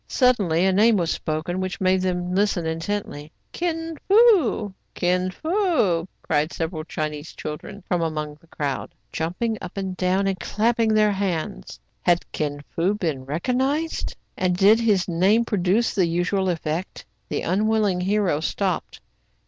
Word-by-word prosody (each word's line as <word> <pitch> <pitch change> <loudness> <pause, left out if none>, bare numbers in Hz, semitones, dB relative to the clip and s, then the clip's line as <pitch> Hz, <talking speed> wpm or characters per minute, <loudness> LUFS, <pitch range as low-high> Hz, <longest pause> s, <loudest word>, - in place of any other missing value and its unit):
Suddenly 200 - +2
a 190 - +3
name 215 +3 +5
was 170 -3 0
spoken 160 +3 -2
which 185 0 -3
made 185 0 +2
them 180 -1 -1
listen 195 -3 +1
intently. 160 -2 -4
'* - - -45
Kin 330 -1 -3
Fo! 385 - +4 0.2
Kin 180 +1 +1
Fo! 315 - +1 0.2
cried 155 +1 0
several 160 -1 -3
Chinese 155 -1 -5
chil 150 - -4
dren 200 +6 -11
from 180 -2 0
among 155 -2 -3
the 165 - -23
crowd, 150 +2 -4 0.2
jumping 200 +7 -2
up 180 - -8
and 190 -1 -3
down, 185 +2 +1
and 195 -1 -1
clapping 225 0 +1
their 215 -1 +4
hands. 195 -1 -3 0.2
Had 175 -1 +1
Kin 145 -1 -3
Fo 185 +5 +1
been 155 -10 -3
recognized 260 - -1
} - - -45
and 180 -1 +1
did 205 +4 +6
his 205 -6 +2
name 190 +7 +3
produce 205 +2 +1
the 185 -4 +2
usual 180 +3 0
effect? 165 +1 -3 0.2
The - - -2
unwilling 205 0 +1
hero 195 -5 +1
stopped. 185 +3 -2
185 Hz, 155 wpm, -23 LUFS, 165-215 Hz, 0.2 s, did